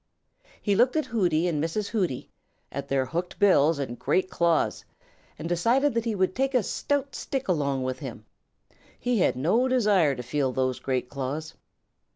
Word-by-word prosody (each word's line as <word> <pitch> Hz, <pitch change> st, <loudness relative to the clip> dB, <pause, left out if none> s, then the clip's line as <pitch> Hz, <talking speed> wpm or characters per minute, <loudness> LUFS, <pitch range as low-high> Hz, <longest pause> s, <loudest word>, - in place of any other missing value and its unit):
He 205 Hz, -, 0 dB
looked 245 Hz, +6 st, +3 dB
at 310 Hz, -, +1 dB
Hooty 175 Hz, -7 st, +1 dB
and 155 Hz, -4 st, 0 dB
Mrs. 200 Hz, +6 st, -2 dB
Hooty, 180 Hz, -, -2 dB, 0.4 s
at 140 Hz, 0 st, -5 dB
their 135 Hz, -2 st, +1 dB
hooked 170 Hz, +7 st, -4 dB
bills 165 Hz, -6 st, +4 dB
and 130 Hz, -4 st, -4 dB
great 185 Hz, 0 st, +1 dB
claws, 170 Hz, -3 st, +1 dB, 0.5 s
and 155 Hz, -, -5 dB
decided 235 Hz, +12 st, +2 dB
that 230 Hz, 0 st, -1 dB
he 225 Hz, -2 st, -1 dB
would 185 Hz, -1 st, +1 dB
take 270 Hz, +1 st, 0 dB
a 245 Hz, -, +4 dB
stout 285 Hz, +3 st, -1 dB
stick 270 Hz, -1 st, -4 dB
along 140 Hz, -7 st, 0 dB
with 130 Hz, 0 st, -3 dB
him. 120 Hz, -6 st, -8 dB, 0.7 s
He 245 Hz, -2 st, 0 dB
had -, -, +3 dB
no 180 Hz, -, +2 dB
desire 205 Hz, -, +3 dB
to 125 Hz, -, -6 dB
feel 130 Hz, +1 st, -1 dB
these 130 Hz, -1 st, 0 dB
great 130 Hz, -2 st, -1 dB
claws. 140 Hz, +4 st, -4 dB
170 Hz, 175 wpm, -26 LUFS, 140-225 Hz, 0.7 s, bills